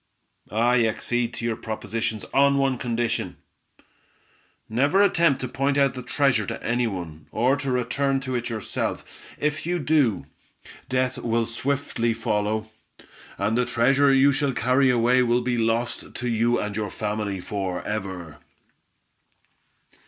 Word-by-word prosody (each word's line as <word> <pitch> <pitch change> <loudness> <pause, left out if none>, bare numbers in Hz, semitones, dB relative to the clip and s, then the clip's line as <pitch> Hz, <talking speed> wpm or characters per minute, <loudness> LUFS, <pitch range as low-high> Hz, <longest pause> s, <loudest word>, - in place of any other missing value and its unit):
"I 120 +5 +2
accede 120 +2 -1
to 115 - -4
your 115 -1 0
proposition 110 0 -3
on 140 0 +4
one 135 -2 +1
condition! 120 -1 -2 1.3
Never 140 - +3
attempt 165 -8 +3
to 125 - -2
point 140 +3 0
out 140 -1 +3
the 125 - -6
treasure 125 -5 +1
to - - -5
any 120 0 +1
one, 85 -7 -7
or 125 +5 +2
to 140 -1 -3
return 130 +2 0
to 130 -1 -4
it 120 -1 -2
yourself. 110 -3 -3 0.3
If 150 +1 -1
you 175 0 +1
do, 145 - +1 0.6
death 130 0 0
will 115 0 0
swiftly 120 -1 -1
follow, 110 -1 -1 0.7
and 110 - 0
the 125 - +3
treasure 130 +3 +3
you 135 +1 +5
shall 140 0 0
carry 130 +3 +3
away 125 +1 +4
will 120 0 +2
be 120 -1 -1
lost 115 +1 -1
to 125 - -4
you 120 +1 +2
and 105 -1 -3
your 105 -1 -2
family 105 -2 -3
for 95 -1 -4
ever." 95 -7 -5
120 Hz, 145 wpm, -24 LUFS, 110-135 Hz, 1.3 s, you